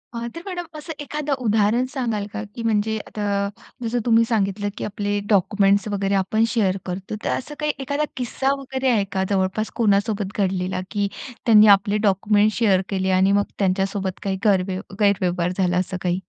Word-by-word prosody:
आह, 235 Hz, 0 st, -3 dB
तर 335 Hz, -, -6 dB
मॅडम 355 Hz, -3 st, -4 dB
असं 320 Hz, +2 st, -7 dB
एखादं, 290 Hz, 0 st, -3 dB
उदाहरण 220 Hz, +3 st, +3 dB
सांगाल 230 Hz, -6 st, -1 dB
का 220 Hz, -, -3 dB
की 235 Hz, -, -5 dB
म्हणजे 220 Hz, -1 st, +1 dB
आता, 200 Hz, -1 st, -1 dB, 0.3 s
जसं 235 Hz, +1 st, 0 dB
तुम्ही 230 Hz, -1 st, +5 dB
सांगितलं, 205 Hz, -2 st, 0 dB
की -, -, -4 dB
आपले 205 Hz, 0 st, -2 dB
डॉक्युमेंट्स 200 Hz, +1 st, +3 dB
वगैरे, 200 Hz, -1 st, -1 dB
आपण 195 Hz, +4 st, +1 dB
शेअर 195 Hz, -4 st, +2 dB
करतो. 190 Hz, +3 st, -5 dB
तर, -, -, -1 dB
असं 295 Hz, +3 st, -3 dB
काही 300 Hz, 0 st, +1 dB
एखादा 285 Hz, +2 st, -1 dB
किस्सा 265 Hz, +2 st, -1 dB
वगैरे, 265 Hz, -1 st, -2 dB
आहे 215 Hz, -4 st, +2 dB
का? 190 Hz, -1 st, 0 dB
जवळपास 195 Hz, +2 st, 0 dB
कोणासोबत 205 Hz, -2 st, +1 dB
घडलेला, 185 Hz, -1 st, -1 dB
की 205 Hz, -2 st, 0 dB, 0.4 s
त्यांनी, 215 Hz, -2 st, +7 dB
आपले 205 Hz, +1 st, -2 dB
डॉक्युमेंट्स 205 Hz, +2 st, +2 dB
शेअर 200 Hz, -5 st, +3 dB
केले 190 Hz, -1 st, -1 dB
आणि 190 Hz, +1 st, +4 dB
मग, 205 Hz, 0 st, +3 dB, 0.2 s
त्यांच्यासोबत 195 Hz, 0 st, 0 dB
काही 190 Hz, -1 st, -1 dB
गरव 190 Hz, -2 st, +3 dB, 0.3 s
गैरव्यवहार 180 Hz, -3 st, +2 dB
झाला 180 Hz, -2 st, +1 dB
असं 185 Hz, 0 st, -1 dB
काही? 180 Hz, 0 st, 0 dB
205 Hz, 175 wpm, -22 LUFS, 195-230 Hz, 0.4 s, त्यांनी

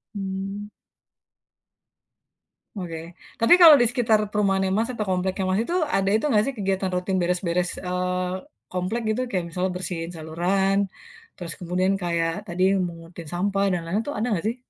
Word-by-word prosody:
Mmm. 195 Hz, +1 st, -4 dB, 2.1 s
Oke. 175 Hz, -4 st, -5 dB, 0.4 s
Tapi 230 Hz, -, +6 dB
kalau 325 Hz, -3 st, +11 dB
di -, -, +5 dB
sekitar 230 Hz, -4 st, +2 dB
perumahannya, 195 Hz, -2 st, +1 dB
Mas, 225 Hz, +3 st, 0 dB
atau 215 Hz, -3 st, -3 dB
kompleknya, 185 Hz, +1 st, 0 dB
Mas, 190 Hz, +2 st, +2 dB
itu, 345 Hz, -, -3 dB, 0.2 s
ada 195 Hz, 0 st, +2 dB
itu 220 Hz, -, +2 dB
enggak 210 Hz, -5 st, +4 dB
sih 275 Hz, -, -2 dB
kegiatan 195 Hz, -1 st, -1 dB
rutin 185 Hz, +1 st, -1 dB
beres-beres, 180 Hz, 0 st, 0 dB
eee, 180 Hz, 0 st, -1 dB, 0.4 s
komplek 185 Hz, +6 st, -2 dB
gitu. 220 Hz, +3 st, 0 dB
Kayak 185 Hz, -6 st, -1 dB
misalnya, 180 Hz, +2 st, -1 dB
bersihin 175 Hz, -2 st, -4 dB
saluran, 180 Hz, +5 st, 0 dB, 0.6 s
terus 170 Hz, -3 st, -7 dB
kemudian 185 Hz, +2 st, 0 dB
kayak 170 Hz, -1 st, 0 dB, 0.2 s
tadi 180 Hz, +1 st, -1 dB, 0.2 s
mungutin 165 Hz, 0 st, -10 dB
sampah 195 Hz, +2 st, 0 dB
dan 175 Hz, -, -1 dB
lain-lain. 195 Hz, +6 st, 0 dB
Itu 290 Hz, -, -3 dB
ada 225 Hz, +4 st, 0 dB
enggak 200 Hz, -4 st, -1 dB
sih? 230 Hz, -, -1 dB
190 Hz, 155 wpm, -24 LUFS, 180-205 Hz, 2.1 s, kalau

